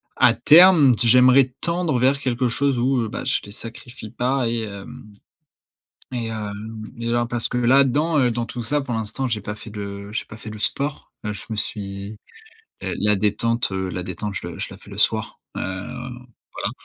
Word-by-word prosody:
à - - +5
terme, 160 -5 +7
d - - -3
j'aimerais 125 +2 +6
tendre 170 -6 +1
vers 135 +2 +2
quelque 125 0 0
chose 135 +2 0
où, 130 +1 +2
heu, 110 - -2
bah, - - -5
je 135 - 0
les 100 - -11
sacrifie 115 +1 -9
pas 125 +1 0
et 115 0 -1
hem 105 +2 -9 1.0
et, 115 -2 -3
hem, 110 0 -6
et 115 0 -3
alors, 120 0 +1
parce 120 -1 +4
que 125 - -1
là-dedans, 140 +5 +3
heu, 125 -2 +3
dans 115 0 -2
tout 120 - -6
ça 145 +6 +1
pour 135 -4 -4
l'instant, 110 +4 -2
j'ai 110 -4 -2
pas 105 +1 -5
fait 110 - -11
de 100 -1 -7
j'ai - - -2
pas 110 - -12
fait 110 - -10
le 110 - -8
sport. 140 +6 -3
Là 105 -1 -3
je - - -9
me 110 - -3
suis, 100 0 -4 0.7
heu, - - -3
la 105 0 +2
détente, 105 +3 +2
heu 95 -1 -2
la 90 +1 -4
détente, 95 +3 -5
heu, 85 - -6
je - - -11
je - - -3
la - - -11
fais - - -17
le - - -9
soir. - - +1 0.2
Hem, - - -4 0.9
voilà. - - -2
115 Hz, 205 wpm, -22 LUFS, 105-130 Hz, 1.0 s, terme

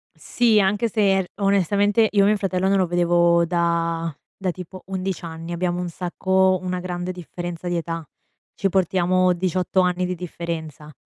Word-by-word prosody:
Sì, 230 -3 +2
anche 205 +4 +1
se 195 -2 +2
r - - -6 0.2
onestamente 200 +3 +3
io 200 -1 +4
mio 210 +1 +4
fratello 190 -2 -1
non 195 0 +3
lo 185 - +3
vedevo 170 0 +3
da 170 -1 0 0.2
da 190 -2 -2
tipo 185 +1 -10
11 190 -1 -3
anni, 165 +1 -7
abbiamo 175 0 -1
un 180 - -3
sacco 185 +2 +1
una 180 0 -2
grande 180 0 -4
differenza 175 0 -7
di 175 -1 0
età. 165 0 -4 0.5
Ci 195 - 0
portiamo 185 0 +2
18 185 +1 0
anni 180 0 +1
di 180 0 -2
differenza. 160 -3 -6
180 Hz, 165 wpm, -22 LUFS, 170-190 Hz, 0.5 s, io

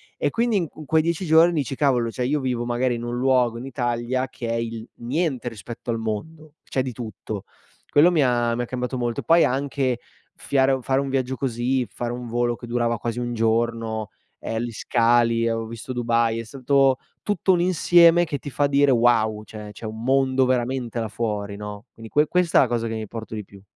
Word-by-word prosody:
E - - 0
quindi 230 -2 +1
i - - +3
in 155 - -10
quei 160 +2 +3
10 170 +3 -1
giorni 165 +2 +6
dici: 140 -3 -2
"Cavolo, 125 -5 +2
cioè, 125 +2 -2
io 150 +3 +1
vivo 125 -3 -1
magari 120 +1 0
in 115 - -6
un 120 0 -3
luogo 125 -2 +2
in 120 - -7
Italia, 125 0 -1
che 120 - -6
è 115 - -1
il 115 0 -4
niente 130 0 -2
rispetto 115 +2 -9
al 115 - -1
mondo, 150 +8 -5
c'è 130 - -1
di 130 -1 -4
tutto". 110 -3 -6 0.5
Quello 160 +5 +5
mi 160 -5 +3
ha 120 -2 +1
mi 120 - -2
ha - - -1
cambiato 125 +1 -3
molto. 120 -2 -2
Poi, 165 0 +5
anche 130 -2 0 0.4
fiare 135 -1 +1
fare 135 +2 +1
un 140 - -3
viaggio 130 -1 -1
così, 125 0 -1
fare 120 +3 -4
un 125 0 -6
volo 120 +1 0
che 120 - -10
durava 120 -1 0
quasi 120 +2 -3
un 120 0 -3
giorno, 115 -1 0 0.3
ehm, 115 0 -3
gli 120 - -4
scali. 115 +1 +2
Avevo 115 0 -2
visto 115 +3 -8
Dubai, 115 -1 +1
è - - -4
stato 135 +2 +2 0.3
tutto 200 -2 +1
un 175 - +2
insieme 175 -1 +5
che 150 -2 -3
ti 145 - -7
fa 145 +1 +1
dire: 140 0 +3
"Wow!" 115 -3 +3
Cioè, 105 +1 -9
c'è 105 - -10
un 110 +1 -6
mondo 130 0 +3
veramente, 125 -1 -1
là 115 - -2
fuori, 105 -2 -3
no? 105 0 -8
Quindi, 115 -1 -12
que 150 +1 +3
questa 180 -1 +3
è - - +7
la - - 0
cosa 115 -1 -1
che 115 - -3
mi 110 -1 -5
porto 110 +1 -8
di 105 -2 -5
più. 100 0 -16
120 Hz, 215 wpm, -23 LUFS, 115-135 Hz, 0.5 s, è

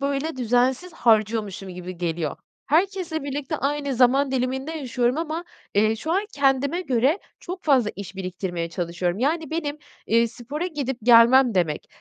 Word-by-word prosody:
böyle 280 +2 -2
düzensiz 250 +7 +1
harcıyormuşum 215 - +1
gibi 180 0 -7
geliyor. 165 -3 -2 0.3
Herkesle 340 0 0
birlikte 285 +2 -3
aynı 280 0 -1
zaman 260 +3 +4
diliminde 265 +4 -1
yaşıyorum 255 -2 -1
ama, 330 +1 -3 0.3
eee, 215 +2 +3
şu 320 +9 -3
an 395 +3 +1
kendime 280 +4 +2
göre 270 - +1 0.2
çok 365 +1 -7
fazla 260 -8 +3
iş 200 -1 -8
biriktirmeye 180 -2 -4
çalışıyorum. 175 +2 -2
Yani, 315 +5 0
benim, 305 -2 -3 0.3
eee, 230 +1 +3
spora 280 +9 -5
gidip 275 -7 -3
gelmem 240 +1 +6
demek, 160 -5 0
260 Hz, 145 wpm, -24 LUFS, 215-295 Hz, 0.3 s, gelmem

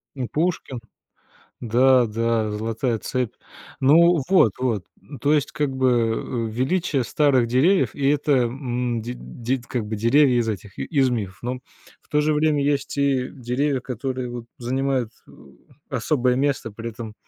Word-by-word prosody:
Ну, 130 -3 -3
Пушкин. 160 -5 -2 0.8
Да 125 +2 +4
да, 115 0 0
золотая 115 +2 -2
цепь. 125 -1 -2 0.5
Ну 165 +5 +5
вот, 180 - +5
вот. 115 -7 -1 0.2
Н 140 - -11
то 145 +1 +2
есть, 145 -3 +1
как 145 -2 -1
бы, 130 0 +2
э, 115 0 -1
величие 140 +4 0
старых 130 0 +2
деревьев, 155 +11 +3
и 140 - 0
это, 150 +1 0
м, 120 -2 -2
ди 120 +2 -5
дид 120 - -4
как 120 -4 -3
бы 110 +1 -4
деревья 125 +4 +4
из 115 -1 0
этих, 100 -2 -6
и - - -2
из 135 -4 +2
мифов. 105 -6 -3
Но, 125 +1 -2 0.5
в - - -33
то 150 - +2
же 155 +1 +2
время, 150 -1 +2
есть 140 -1 -1
и 140 -2 +1
деревья, 130 +2 -1
которые, 125 0 -4
вот, 120 -1 -6
занимают, 130 -1 -1 0.2
э, - - -17 0.6
особое 125 0 +1
место, 135 -4 0
при 115 +2 -6
этом 110 -1 -8
125 Hz, 165 wpm, -23 LUFS, 115-140 Hz, 0.8 s, Ну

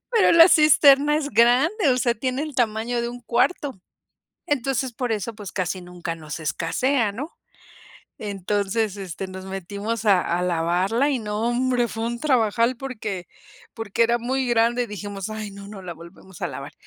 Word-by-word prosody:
Pero 450 -4 +5
la 335 +1 +9
cisterna 295 -1 +6
es 295 -1 -2
grande, 260 - +3
o 250 - +3
sea, 240 -1 +1
tiene 255 +4 -2
el 305 -3 -6
tamaño 235 0 0
de 235 - -2
un 245 0 -8
cuarto. 250 - 0 0.7
Entonces, 265 -2 -1
por 245 +1 -3
eso, 220 +1 -3
pues, 205 -3 -9
casi 185 0 -2
nunca 175 -1 -6
nos 155 -2 -7
escasea, 200 - 0
¿no? 280 +10 -6 0.9
Entonces, 205 +1 -1
este, 190 -1 -6
nos 190 0 -9
metimos 200 +4 -4
a 195 -3 +5
a 175 +1 -1
lavarla, 180 - +1
y 270 - +1
no, 210 -1 -3
hombre, 245 0 +1
fue 225 +1 -4
un 235 0 -3
trabajal, 235 -3 +2
porque 215 -9 -5 0.5
porque 225 0 0
era 235 +1 +2
muy 260 +2 -1
grande, 240 +1 +2
y - - -7
dijimos: 205 0 -6
"Ay, 215 -1 -5
no, 200 0 -11
no 200 -2 -9
la 175 -2 -7
volvemos 170 +2 -14
a - - +1
lavar". 140 -1 -8
225 Hz, 175 wpm, -23 LUFS, 195-255 Hz, 0.9 s, la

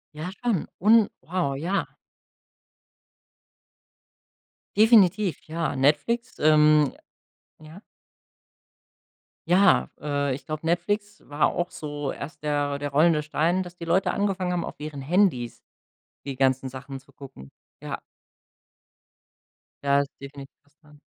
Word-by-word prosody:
Ja, 165 +5 -5
schon. 230 -9 0
Und, 215 +1 +5
wow, 170 -6 -2
ja. 175 +8 -1 2.9
Definitiv 210 - +5
ja. 160 -2 -2
Netflix, 230 - +1
ähm 150 -1 +5 0.7
ja. 155 +5 -13 1.7
Ja, 190 +2 +4
äh, 140 -2 -1
ich - - -11
glaube 155 0 -5
Netflix 205 +5 -1
war 145 +1 +2
auch 175 +1 -2
so 145 -2 -5
erst 150 +1 -9
der 145 -1 0
der 145 0 -3
rollende 155 +1 +3
Stein, 170 +5 0
dass 175 0 -11
die 170 - -7
Leute 180 +3 +2
angefangen 190 -3 -1
haben, 175 - -1
auf - - -9
ihren 150 -2 -6
Handys 155 - +1 0.6
die 135 -2 -4
ganzen 130 0 +1
Sachen 135 +1 -8
zu 140 - -24
gucken. 135 - -13 0.3
Ja. - - -5 1.8
Da 140 0 +3
ist 140 - -6
definitiv 140 0 -10
was 145 +1 -34
dran. 150 -2 -20
155 Hz, 120 wpm, -25 LUFS, 140-180 Hz, 2.9 s, Und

